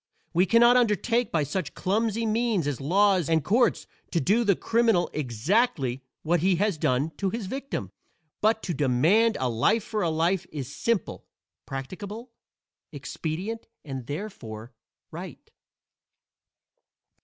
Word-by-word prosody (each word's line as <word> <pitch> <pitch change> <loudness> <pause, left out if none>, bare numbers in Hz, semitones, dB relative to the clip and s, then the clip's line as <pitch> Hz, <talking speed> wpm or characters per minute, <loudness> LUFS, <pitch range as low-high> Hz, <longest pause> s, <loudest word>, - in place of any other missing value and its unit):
We 180 +3 +3
can 230 +4 +5
not 240 +1 +7
undertake 235 +1 +1
by 155 -3 +1
such 180 +7 -3
clumsy 220 +3 0
means 220 -5 +1
as 145 -2 -2
laws 185 +2 +3
and 160 -2 +2
courts 230 - +2 0.2
to 170 - 0
do 200 - +2
to - - +2
the 200 -2 +4
criminal 225 -5 +2
exactly 135 - 0 0.2
what 170 +2 +2
he 185 +3 +3
has 195 -2 0
done 135 +5 +1
to 195 - 0
his 225 +1 -4
victim, 270 +7 -4 0.5
but 220 +1 +2
to 175 - -2
demand 155 - +3
a 130 - 0
life 125 - +2
for 215 -2 -3
a 170 - +1
life 170 +3 0
is 145 -2 -6
simple, 230 +2 -2 0.4
practicable, 200 - -7 0.6
expedient 190 +8 -5 0.2
and 135 -4 -6
(therefore) 125 - -7 0.4
right. - - -9
190 Hz, 140 wpm, -26 LUFS, 145-225 Hz, 0.6 s, not